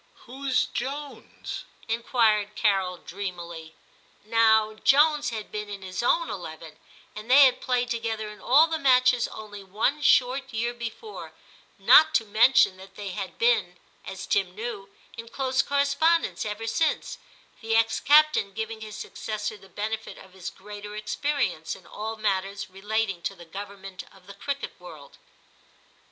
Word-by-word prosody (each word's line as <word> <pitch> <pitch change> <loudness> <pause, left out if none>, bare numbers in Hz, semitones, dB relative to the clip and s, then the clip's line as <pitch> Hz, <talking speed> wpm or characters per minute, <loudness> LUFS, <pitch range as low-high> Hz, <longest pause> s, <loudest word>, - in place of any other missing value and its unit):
* - - -35
Who's 265 +1 0
Jones? 280 +3 -6
' - - -34
inquired 225 -3 +1
Carol 195 -4 +1
dreamily. 170 -4 -7 0.5
Now 220 -1 +4
Jones 295 +6 +3
had 220 -3 -6
been 210 -1 -5
in 200 -1 -7
his 185 +1 -4
own - - +2
eleven, - - -8 0.4
and 215 +2 -9
they 275 +2 +9
had 255 -1 +2
played 245 -1 0
together 225 -2 -2
in 210 -2 -12
all 280 +6 +6
the 325 -1 -3
matches 255 -3 +4
only 205 -2 -9
one 220 +10 -1
short 265 0 +3
year 235 +1 -1
before, 240 - -8 0.4
not 315 0 +6
to 225 - +3
mention 220 -1 +4
that 195 +1 -14
they 205 -1 -6
had 190 0 -6
been, 220 -7 +2 0.3
as 190 0 -7
Tim 190 -3 0
knew, 215 -3 -6 0.3
in 230 0 -8
close 260 +1 0
correspondence 285 +1 +1
ever 210 +2 -5
since, 315 +8 -1 0.4
the 225 -1 0
ex 225 0 +2
captain 300 -9 +4
giving 220 +1 -5
his 215 -1 -8
successor 215 0 -5
the 195 -1 -17
benefit 220 +4 -4
of 190 - -15
his 190 -2 -6
greater 205 +1 -10
experience 215 - -2
in - - -16
all 220 +1 -5
matters 195 -2 -2
relating 200 -1 -2
to 195 - -3
the 175 -2 -13
government 195 +1 -8
of 190 -1 -20
the 200 - -11
cricket 280 +7 -4
world. - - -13
220 Hz, 155 wpm, -26 LUFS, 200-255 Hz, 0.5 s, they